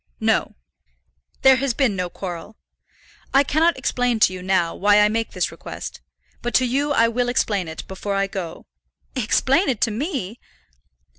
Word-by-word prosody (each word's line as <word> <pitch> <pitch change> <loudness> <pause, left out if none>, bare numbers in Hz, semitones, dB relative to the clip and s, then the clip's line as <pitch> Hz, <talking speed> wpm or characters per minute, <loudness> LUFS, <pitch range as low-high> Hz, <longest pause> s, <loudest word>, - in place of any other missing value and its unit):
"No; - - +1 0.9
there 265 -1 +7
has 265 -3 -1
been 260 -8 +2
no 180 -1 -2
quarrel. 180 +3 -7 0.8
I 275 - +7
cannot 315 +3 +2
explain 245 -2 0
to 185 - +5
you 185 - -7
now 185 -2 +1
why 205 +1 +4
I 210 0 +5
make 225 +1 -2
this - - -1
request; - - -8 0.4
but 240 -1 -3
to 255 - +4
you 280 +4 0
I 230 -5 +4
will 245 +1 0
explain 205 -7 0
it 160 0 -8
before 200 +1 -4
I 195 0 +2
go." 185 -4 -6 0.5
"Explain 265 - +2
it 245 -5 -1
to 230 - +2
me!" 240 - -4
225 Hz, 165 wpm, -22 LUFS, 195-260 Hz, 0.9 s, there